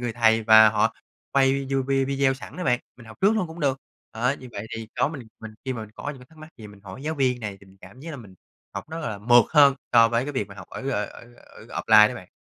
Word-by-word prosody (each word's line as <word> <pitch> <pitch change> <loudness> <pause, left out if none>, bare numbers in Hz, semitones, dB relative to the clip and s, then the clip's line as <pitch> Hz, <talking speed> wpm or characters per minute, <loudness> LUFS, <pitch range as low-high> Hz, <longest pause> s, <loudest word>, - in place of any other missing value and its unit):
người 120 -2 -3
thầy 115 -1 +2
mà 110 0 +8
họ 105 0 +1 0.4
quay 135 -1 +4
video 135 0 -1 0.2
video 135 -1 +1
sẵn 130 - -11
á 180 - -4
bạn, 125 -1 +1 0.2
mình 120 -2 -15
học 110 - -13
trước 200 +2 +4
luôn 185 - 0
cũng 165 +1 -11
được. 135 -3 0 0.4
Đó, 125 +5 0
như 130 - -10
vậy 100 +1 -6
thì 110 -1 -8
có - - +3
mình 135 -8 -9
mình 110 -1 -10
khi 130 - -2
mà 120 - -6
mình 110 -1 -9
có 145 - -5
những 140 - -10
cái 125 - -15
thắc 160 - -21
mắc 155 +1 -12
gì 110 - -10
mình 100 -1 -15
hỏi 100 +6 -11
giáo 155 +2 -3
viên 130 -4 0
này 105 -3 -5
thì 100 - -18
mình 95 0 -20
cảm 130 - -15
giác 165 +4 -8
là 155 - -7
mình 105 -7 -13 0.4
học - - -5
rất 160 - -5
là 110 -10 -4
mượt 120 +2 +5
hơn 145 -3 +6 0.2
so 115 -1 +6
với 115 +2 0
cái 145 - -5
việc 130 -7 -2
mà 100 - -12
học 95 -3 -12
ở 135 - -5
ở 105 -6 -1
ở 120 0 -14
ở - - -15
offline 105 0 +6
đó 125 - -6
bạn. 95 -7 -11
125 Hz, 295 wpm, -24 LUFS, 110-140 Hz, 0.4 s, mà